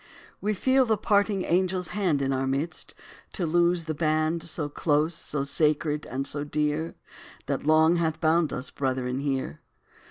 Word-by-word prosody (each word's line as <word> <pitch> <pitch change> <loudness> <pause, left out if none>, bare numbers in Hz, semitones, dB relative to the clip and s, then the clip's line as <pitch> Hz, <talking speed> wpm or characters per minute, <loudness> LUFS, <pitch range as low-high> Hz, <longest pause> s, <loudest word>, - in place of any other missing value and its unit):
We 210 +1 0
feel 260 +5 +3
the 220 -1 +2
parting 205 -1 +1
angel's 180 0 0
hand 175 -9 0
Is - - +1
in 135 - 0
our 135 0 -1
midst, 140 +6 -3 0.4
to 180 - -2
loose 170 +1 +2
the 160 0 -3
band 155 +1 0
So 160 -2 -2
close, 150 +2 +1
so 150 -3 -3
sacred, 150 +1 +1
and 135 +1 -3
so 145 +1 0
dear, 150 +2 -1 0.5
That - - -3
long 160 +2 +5
hath 160 -2 -1
bound 160 -2 +2
us, 130 - -3
brethren, 130 -1 -2
here. 135 - -3
155 Hz, 165 wpm, -26 LUFS, 145-175 Hz, 0.5 s, long